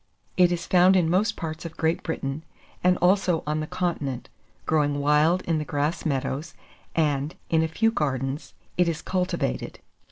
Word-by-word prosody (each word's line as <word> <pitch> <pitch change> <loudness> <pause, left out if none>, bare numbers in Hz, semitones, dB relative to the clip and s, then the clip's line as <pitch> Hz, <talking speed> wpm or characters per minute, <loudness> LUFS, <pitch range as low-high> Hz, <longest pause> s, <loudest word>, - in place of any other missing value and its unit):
It 180 -1 +5
is 170 -1 -2
found 185 +1 +5
in 170 -3 +3
most 210 +5 +2
parts 160 -1 -5
of 165 -2 -8
Great 160 +1 +1
Britain, 150 -2 -4 0.4
and 180 0 +4
also 180 -2 +3
on 150 +1 -1
the 155 - -3
continent, 145 -9 -3 0.4
growing 145 -2 +1
wild 150 +5 +3
in 165 -2 0
the - - -2
grass 150 +3 -1
meadows, 140 +1 -2 0.4
and, 150 -1 0 0.2
in 160 -1 +4
a 160 - +1
few 225 +8 +1
gardens, 135 - -2 0.2
it 175 -1 +4
is 160 - -4
cultivated. 180 - -2
160 Hz, 165 wpm, -25 LUFS, 150-180 Hz, 0.4 s, It